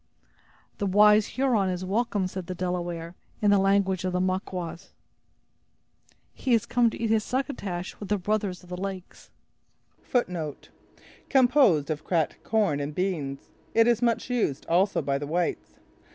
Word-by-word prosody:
"The 200 - 0
wise 210 +2 +5
Huron 240 -8 +2
is 180 0 -3
welcome," 205 0 0
said 185 -1 -5
the 185 - -4
Delaware, 175 -2 -3 0.3
in 205 -1 +3
the 200 - +5
language 195 -1 +2
of 185 -1 -2
the 180 - +1
Maquas; 185 -1 -3 1.4
"he 250 -3 +1
is 225 - 0
come 240 -2 +3
to - - -8
eat 225 -1 0
his 220 -1 +3
'succotash', 210 -10 -3
with 205 - -7
his 205 -1 +1
brothers 200 -2 -2
of 180 - -16
the 180 0 -6
lakes." 190 -2 -7 0.9
A 245 - +5
dish 160 -5 -6 0.6
composed 245 - +4
of 155 0 -4
cracked 165 -4 -1
corn 205 -10 +1
and 145 +1 -4
beans. 155 -8 -3 0.3
It 225 0 +6
is 235 -1 +3
much 235 +1 0
used 220 - -1
also 185 +4 +2
by 140 -1 0
the 145 - -5
whites. 175 +3 -2
190 Hz, 160 wpm, -26 LUFS, 175-215 Hz, 1.4 s, It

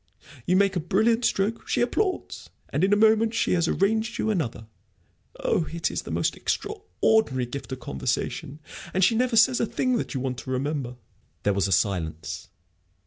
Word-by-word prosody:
You 180 - +3
make 195 0 +3
a - - +1
brilliant 225 +8 +2
stroke; 205 +4 0
she - - 0
applauds, 370 - -1 0.2
and 150 - -1
in 195 - +3
a - - +6
moment 220 +1 +4
she - - +1
has 170 -2 +2
arranged 220 +6 +1
you 220 - 0
another. 140 - -2 0.7
Oh, 160 - 0
it 170 0 -1
is - - -2
the - - -10
most - - 0
extraordinary 220 - 0
gift 135 +3 -7
of 130 -1 -5
conversation 95 - -3 0.3
and 190 - +3
she 210 - +5
never 245 +1 +1
says 245 +2 +5
a 230 - +1
thing 255 +2 0
that - - -4
you - - 0
want 125 -1 -3
to 130 - -9
remember." 130 -1 -2 0.5
There 100 - +2
was 100 -1 +1
a - - -4
silence. 80 -4 -1
185 Hz, 185 wpm, -25 LUFS, -, 0.7 s, a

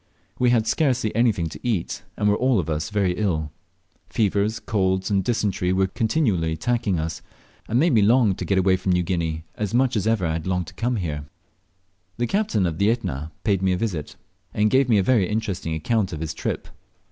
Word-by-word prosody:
We 125 -1 +4
had 115 -2 +3
scarcely 125 -6 +1
anything 110 -8 +2
to - - -9
eat, 110 -9 -2 0.2
and 105 - +1
were 105 - +4
all 130 +1 +2
of 80 -4 -1
us 75 +6 -2
ill. 90 -6 0 0.6
Fevers, 105 -1 0
colds, 95 -2 0
and 100 -1 +2
dysentery 100 -5 0
were 95 +1 +2
continually 110 - 0
attacking 110 +2 0
us, 80 0 -4 0.5
and 115 - 0
made 165 +1 +3
me 110 - +5
long 115 +2 +4
I - - +3
o 95 - -4
get 100 - +1
away 95 0 +3
from 90 0 0
New 90 0 +2
Guinea, 80 -3 -2
as 105 +1 -3
much 130 -1 +2
as 105 -1 0
ever 110 -5 +1
I 80 - 0
had 80 +2 -4
longed 90 -1 0
to 90 - -12
come 120 +6 -1
there. 75 -8 -3 0.9
The 120 - 0
captain 120 - +1
of 80 -2 -2
the 100 +2 +3
Etna 80 - -2
paid 100 -4 +1
me 95 -1 +2
a - - 0
visit, 90 -8 -3 0.4
and 105 0 +2
gave 130 -1 +3
me 110 - +5
a 100 - +3
very 105 -5 +2
interesting 100 -7 -2
account 95 +4 0
of 80 - -5
his 80 -1 -3
trip. - - -4
100 Hz, 210 wpm, -23 LUFS, 90-115 Hz, 0.9 s, me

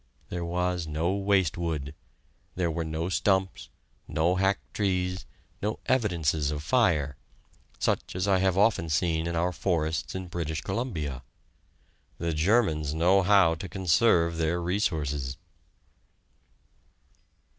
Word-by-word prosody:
There 90 -1 -3
was 90 0 -1
no 80 +4 0
waste 100 -4 +1
wood; 75 -5 -3 0.6
there 85 -2 0
were 85 +1 -2
no 80 +1 -3
stumps, 95 0 0 0.4
no 80 +3 +1
hacked 95 +1 0
trees, 90 -2 -1 0.3
no 105 +2 -1
evidences 85 - +1
of 75 0 -4
fire 75 - +2 0.6
such - - -1
as 90 +2 -1
I 95 -2 +3
have 95 -1 +1
often 100 -5 +3
seen 80 +2 +1
in 85 - -2
our 85 +2 +1
forests 80 -3 -1
in 95 0 -4
British 80 -3 -3
Columbia. 85 - -3 1.0
The 85 0 -2
Germans 80 -4 +2
know 90 +4 +4
how 95 -3 +5
to 85 +3 -7
conserve 85 -2 +2
their 80 +2 0
resources! 75 -7 -1
85 Hz, 125 wpm, -27 LUFS, 80-95 Hz, 1.0 s, how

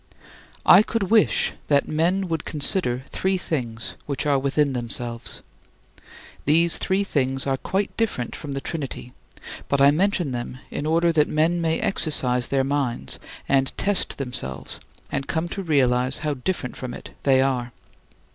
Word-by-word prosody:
I - - +9
could 215 -3 -2
wish 225 -2 +4
that 140 -1 +3
men 175 +5 +1
would 165 -3 -2
consider 145 -4 0
three 190 0 0
things 120 -10 -3
which 140 0 -2
are 140 -2 +3
within 140 +1 +1
themselves. 120 -1 -4 1.0
These 165 +3 +4
three 195 +1 +1
things 135 -7 0
are 135 -1 +1
quite 190 +8 -2
different 215 - -1
from 145 -2 -6
the 135 - -3
Trinity, 135 -6 -5 0.6
but 140 - +2
I 140 +1 +7
mention 175 -2 +1
them 120 +1 -4
in 145 - -3
order 170 +2 +3
that 150 -2 +3
men 165 +3 +1
may 160 -1 +1
exercise 125 -9 0
their 135 -1 +1
minds 135 - -2 0.3
and 135 -1 +1
test 205 0 +1
themselves 125 - -4 0.3
and 135 - -2
come 160 +7 -1
to 195 - -4
realize 130 -6 +2
how 150 - +1
different 130 -1 -3
from 125 -2 -6
it - - -10
they 135 -2 +4
are. 130 -2 0
140 Hz, 155 wpm, -24 LUFS, 130-165 Hz, 1.0 s, I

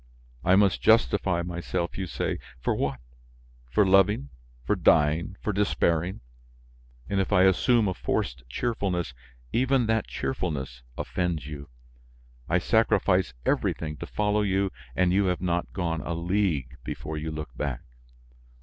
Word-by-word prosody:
I 95 - +5
must 100 -1 +3
justify 100 -6 +3
myself, 85 0 -3
you 95 -1 -3
say! - - -2 0.2
For - - 0
what? 70 -2 -1 0.7
For 100 +11 +3
loving, 95 -6 +3 0.3
for - - +1
dying, 80 +5 +3
for 105 - 0
despairing? 90 -4 +1 0.9
And 100 - 0
if 95 - 0
I 90 -2 +5
assume 105 +4 +4
a 95 - 0
forced 65 -6 -2
cheerfulness, 90 - -1 0.4
even 130 0 +3
that 110 0 +1
cheerfulness 70 - -3 0.2
offends 85 -6 -2
you. 70 -1 -8 0.8
I - - +3
sacrifice - - +2
everything 75 -1 0
to - - -7
follow 105 0 +1
you 95 -1 +1 0.2
and 90 -1 +3
you 100 +1 +3
have 90 -1 0
not 90 -1 -1
gone 85 -4 -2
a 85 - -3
league 85 -7 0
before 75 +1 -5
you 80 +1 -4
look 75 -5 -6
back. 65 -2 -3
90 Hz, 140 wpm, -27 LUFS, 75-100 Hz, 0.9 s, I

